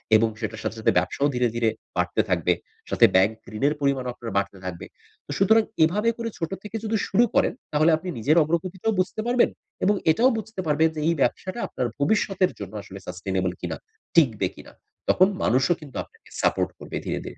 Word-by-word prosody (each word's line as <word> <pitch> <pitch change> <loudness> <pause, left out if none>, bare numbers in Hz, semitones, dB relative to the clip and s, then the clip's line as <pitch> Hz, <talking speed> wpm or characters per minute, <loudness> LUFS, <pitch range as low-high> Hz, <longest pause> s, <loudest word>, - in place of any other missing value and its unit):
এবং 110 +1 +4
সেটার 110 -1 -4
সাথে, 115 - -3
সাথে 110 - +3
ব্যবসাও 90 +10 +1
ধীরে, 125 0 +2
ধীরে 115 -1 +2 0.3
বাড়তে - - +2
থাকবে। - - +2 0.4
সাথে - - +6
ব্যাংক 95 +4 +5 0.2
ঋণের 140 +7 +2
পরিমাণও 135 -3 0
আপনার 115 -2 -7
বাড়তে 100 0 -1
থাকবে। 90 -2 -5 0.4
তো - - -8
সুতরাং 220 +3 +5 0.2
এভাবে 205 +8 +2
করে 230 -1 -3
ছোট 165 0 -3
থেকে 210 +1 -8
যদি 220 0 -1
শুরু 235 - +4
করেন - - +3 0.2
তাহলে 155 +2 +4
আপনি 180 +3 -7
নিজের 150 +9 +3
অগ্রগতিটাও 180 +6 -1
বুঝতে 185 +4 0
পারবেন 245 0 +4 0.3
এবং 205 +2 +4 0.2
এটাও 240 +10 +4
বুঝতে 220 -2 -7
পারবেন 155 +2 +3
যে - - -3
এই 170 - +4
ব্যবসাটা 185 - 0
আপনার 125 - -2
ভবিষ্যতের 195 +2 +2
জন্য 100 0 -7
আসলে 95 0 -10
Sustainable 90 0 -2
কিনা, 80 -3 -3 0.4
টিকবে 115 - +4
কিনা। - - -13 0.4
তখন 185 - +6 0.2
মানুষও 130 +7 +3
কিন্তু 145 -4 -12
আপনাকে - - -22
সাপোর্ট - - +2
করবে - - -6
ধীরে, - - -2
ধীরে। - - -8
150 Hz, 185 wpm, -25 LUFS, -, 0.4 s, সাথে